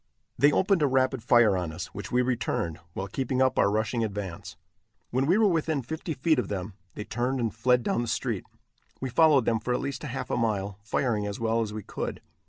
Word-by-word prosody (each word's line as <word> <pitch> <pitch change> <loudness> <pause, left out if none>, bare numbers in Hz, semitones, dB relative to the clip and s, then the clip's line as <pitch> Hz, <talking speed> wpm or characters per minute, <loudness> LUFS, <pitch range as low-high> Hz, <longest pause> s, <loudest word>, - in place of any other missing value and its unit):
They 145 +1 +5
opened 190 +2 +2
a 145 - +4
rapid 130 -1 +1
fire 115 -3 +5
on 90 -3 -2
us, 80 +1 -7
which 100 - -7
we 125 +1 +3
returned, 105 -9 -1
while 95 - -4
keeping 130 +5 -2
up 130 0 +3
our - - +4
rushing 110 +3 0
advance. 100 -5 -5 0.5
When 130 +3 +1
we 180 +5 +4
were 220 -1 +5
within 160 -5 0
fifty 160 +5 -4
feet 155 +4 +2
of - - -1
them, 100 0 -4 0.2
they 105 - -4
turned 125 +4 -1
and 115 -2 -1
fled 125 +2 +2
down 120 - 0
the 120 - -3
street. 110 - -2 0.5
We 130 -2 -4
followed 145 -2 +5
them 115 -1 +2
for 125 +3 -1
at - - -1
least 140 - -4
half 135 -3 -5
a - - +1
mile, 100 -4 -1
firing 110 0 0
as 100 - -5
well 115 0 +1
as 110 -2 -2
we 105 -1 -6
could. - - -5
120 Hz, 220 wpm, -27 LUFS, 105-135 Hz, 0.5 s, They